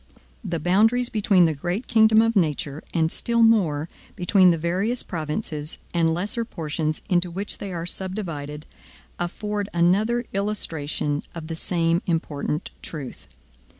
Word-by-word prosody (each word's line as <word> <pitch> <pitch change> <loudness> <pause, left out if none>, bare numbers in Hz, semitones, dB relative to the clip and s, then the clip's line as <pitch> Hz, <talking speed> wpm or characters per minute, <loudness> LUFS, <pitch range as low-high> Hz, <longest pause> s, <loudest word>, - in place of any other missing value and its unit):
The 175 -5 -2
boundaries 225 +9 +3
between 200 -4 +4
the 160 - +2
great 175 - -3
kingdom 220 -1 +5
of 225 0 +1
nature, 150 -4 0
and, 160 -1 +1
still 235 -1 +1
more, 170 -10 +3 0.3
between 185 +1 +4
the 170 - +3
various 190 +9 0
provinces, 155 -1 -4 0.2
and 165 -2 +2
lesser 205 +8 0
portions, 155 -6 -3
into 175 -1 +2
which 195 +4 -4
they 200 - -5
are 170 -1 -4
subdivided, 165 -6 -2 0.5
afford 205 +3 -3
another 210 +8 +2
illustration 160 -8 -2
of 165 -2 -6
the 165 0 -5
same 170 0 +1
important 155 -3 -2
truth. 145 -6 -8
175 Hz, 135 wpm, -24 LUFS, 160-210 Hz, 0.5 s, kingdom